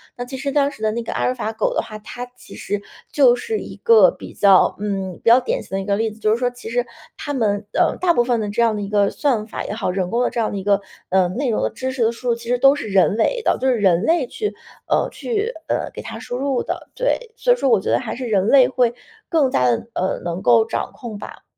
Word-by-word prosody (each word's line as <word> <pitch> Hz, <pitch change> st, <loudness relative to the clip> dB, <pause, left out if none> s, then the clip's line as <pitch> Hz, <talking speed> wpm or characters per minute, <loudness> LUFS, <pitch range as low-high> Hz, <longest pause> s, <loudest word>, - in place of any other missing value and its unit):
那 245 Hz, -, -5 dB
其 260 Hz, +2 st, -7 dB
实 280 Hz, +1 st, -3 dB
当 285 Hz, 0 st, +2 dB
时 220 Hz, -, -14 dB
的 215 Hz, -, +2 dB
那 235 Hz, +2 st, -3 dB
个 -, -, -5 dB
阿 -, -, -2 dB
尔 255 Hz, -, +1 dB
法 220 Hz, -3 st, -3 dB
狗 225 Hz, -, -1 dB
的 -, -, +1 dB
话， 215 Hz, -, -9 dB
它 245 Hz, +3 st, -7 dB
其 -, -, -14 dB
实 205 Hz, 0 st, -3 dB, 0.3 s
就 260 Hz, -4 st, +5 dB
是 440 Hz, -, -3 dB
一 -, -, -8 dB
个 465 Hz, +1 st, +6 dB
比 -, -, -11 dB
较 195 Hz, -2 st, +5 dB
嗯， 195 Hz, -3 st, -3 dB
比 -, -, -7 dB
较 240 Hz, -, +8 dB
典 255 Hz, -, -2 dB
型 -, -, -6 dB
的 195 Hz, -, -1 dB
一 -, -, -7 dB
个 200 Hz, 0 st, +1 dB
例 220 Hz, +1 st, -1 dB
子， 215 Hz, -, -15 dB
就 215 Hz, -, +1 dB
是 225 Hz, -, +2 dB
说 250 Hz, 0 st, 0 dB
其 245 Hz, -2 st, -10 dB
实 240 Hz, +1 st, 0 dB, 0.3 s
它 290 Hz, -, -4 dB
们 210 Hz, -5 st, 0 dB
呃， -, -, +2 dB
大 360 Hz, -2 st, +2 dB
部 240 Hz, -, +3 dB
分 240 Hz, -1 st, 0 dB
的 215 Hz, -, -2 dB
这 235 Hz, +3 st, 0 dB
样 230 Hz, -2 st, +3 dB
的 205 Hz, -, -3 dB
一 200 Hz, -, -4 dB
个 205 Hz, -1 st, +2 dB
算 245 Hz, -8 st, 0 dB
法 -, -, -5 dB
也 -, -, -4 dB
好， 220 Hz, -, -2 dB
人 185 Hz, -1 st, -2 dB
工 235 Hz, -, +1 dB
的 -, -, +1 dB
这 -, -, -4 dB
样 220 Hz, -, 0 dB
的 205 Hz, -, -4 dB
一 195 Hz, -, -5 dB
个 200 Hz, 0 st, +3 dB, 0.3 s
呃， 185 Hz, -1 st, +3 dB
内 250 Hz, +7 st, -2 dB
容 220 Hz, -, 0 dB
的 -, -, +1 dB
知 260 Hz, +3 st, -4 dB
识 260 Hz, -2 st, -1 dB
的 230 Hz, -, +2 dB
输 240 Hz, +2 st, -8 dB
入 235 Hz, -, +3 dB
其 235 Hz, 0 st, -11 dB
实 245 Hz, +1 st, +1 dB
都 275 Hz, +2 st, +6 dB
是 225 Hz, -, -5 dB
人 200 Hz, +2 st, +3 dB
为 475 Hz, -, +1 dB
的， -, -, +2 dB
就 265 Hz, -, 0 dB
是 255 Hz, -, +3 dB
人 185 Hz, -4 st, +3 dB
类 330 Hz, -4 st, +2 dB
去 420 Hz, -, -4 dB, 0.3 s
呃， -, -, +1 dB
去 450 Hz, 0 st, -2 dB, 0.2 s
呃， -, -, -1 dB
给 -, -, -7 dB
它 -, -, -7 dB
输 245 Hz, -, -5 dB
入 270 Hz, -1 st, 0 dB
的， -, -, -5 dB
对。 -, -, -1 dB
所 -, -, +1 dB
以 -, -, 0 dB
说 275 Hz, -, 0 dB
我 225 Hz, -5 st, +5 dB
觉 -, -, -3 dB
得 -, -, +3 dB
还 245 Hz, -, -5 dB
是 255 Hz, -, -5 dB
人 200 Hz, -3 st, +1 dB
类 265 Hz, +1 st, +6 dB
会 245 Hz, -3 st, +1 dB, 0.3 s
更 310 Hz, -7 st, +2 dB
加 125 Hz, -, +2 dB
地 115 Hz, -, -2 dB
呃， 185 Hz, -, -1 dB
能 175 Hz, +1 st, -3 dB
够 230 Hz, -2 st, +5 dB
掌 -, -, -3 dB
控 225 Hz, -4 st, -7 dB
吧。 -, -, -10 dB
235 Hz, 310 characters per minute, -20 LUFS, 205-265 Hz, 0.3 s, 较